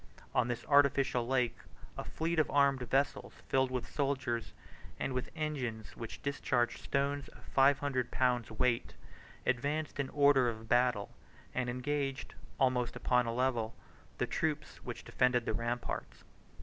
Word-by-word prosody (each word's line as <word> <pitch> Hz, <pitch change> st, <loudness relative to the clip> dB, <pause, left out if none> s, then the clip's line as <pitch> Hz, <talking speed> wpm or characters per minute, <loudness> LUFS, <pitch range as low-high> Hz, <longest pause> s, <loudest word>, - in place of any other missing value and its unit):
On -, -, +3 dB
this 120 Hz, -1 st, -3 dB
artificial 140 Hz, -4 st, +4 dB
lake, 125 Hz, -2 st, +1 dB, 0.4 s
a -, -, -4 dB
fleet 165 Hz, +1 st, -1 dB
of 155 Hz, -, +3 dB
armed 140 Hz, -2 st, +3 dB
vessels 135 Hz, +3 st, +1 dB, 0.2 s
filled 130 Hz, -1 st, +3 dB
with 125 Hz, -2 st, -3 dB
soldiers, 135 Hz, -5 st, -1 dB, 0.5 s
and 135 Hz, -, -1 dB
with 125 Hz, 0 st, -2 dB
engines 130 Hz, -9 st, -3 dB
which 115 Hz, -, -7 dB
discharged 130 Hz, -4 st, 0 dB
stones 140 Hz, 0 st, -1 dB
of -, -, -16 dB
five 135 Hz, +1 st, +4 dB
hundred 130 Hz, -4 st, -1 dB
pounds 125 Hz, -3 st, +1 dB
weight, 115 Hz, +2 st, 0 dB, 0.5 s
advanced 145 Hz, +5 st, -1 dB
in 135 Hz, -2 st, 0 dB
order 140 Hz, -3 st, +5 dB
of 110 Hz, -1 st, -7 dB
battle, 120 Hz, -4 st, +2 dB, 0.4 s
and 125 Hz, -1 st, -1 dB
engaged, 135 Hz, +1 st, -2 dB, 0.3 s
almost 125 Hz, -2 st, +2 dB
upon 125 Hz, -1 st, +2 dB
a -, -, 0 dB
level, 120 Hz, -2 st, 0 dB, 0.4 s
the -, -, +1 dB
troops -, -, -2 dB
which -, -, -7 dB
defended 125 Hz, -2 st, +2 dB
the -, -, 0 dB
ramparts. 120 Hz, +1 st, -3 dB
130 Hz, 145 wpm, -33 LUFS, 120-140 Hz, 0.5 s, order